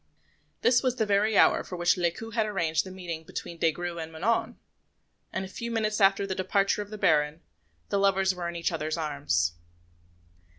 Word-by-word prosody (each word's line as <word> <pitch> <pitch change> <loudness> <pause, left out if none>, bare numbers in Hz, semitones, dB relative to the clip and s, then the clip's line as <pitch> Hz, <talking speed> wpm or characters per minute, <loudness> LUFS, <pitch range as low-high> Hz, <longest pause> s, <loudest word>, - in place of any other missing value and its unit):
This 245 0 +4
was 255 -2 0
the 220 - 0
very 205 +1 +2
hour - - +5
for 180 - -7
which 175 0 +3
Lescaut 180 +6 -2
had 220 -1 +1
arranged 170 -4 0
the - - -7
meeting 175 -4 -6
between 165 +1 -7
Des 165 - +3
Grieux 175 +1 -5
and 160 0 -6
Manon; 225 +7 0 0.7
and 190 - -3
a - - -7
few 235 +5 -6
minutes 215 -2 -1
after 195 0 +4
the 195 - -2
departure 195 +2 +1
of 205 - -7
the 215 - -7
Baron, 150 -3 +2 0.5
the 200 - +1
lovers 195 -1 +3
were 175 -1 -4
in 170 - -7
each 170 0 -1
other's 155 0 -2
arms. 140 - 0
190 Hz, 195 wpm, -28 LUFS, 165-210 Hz, 0.7 s, hour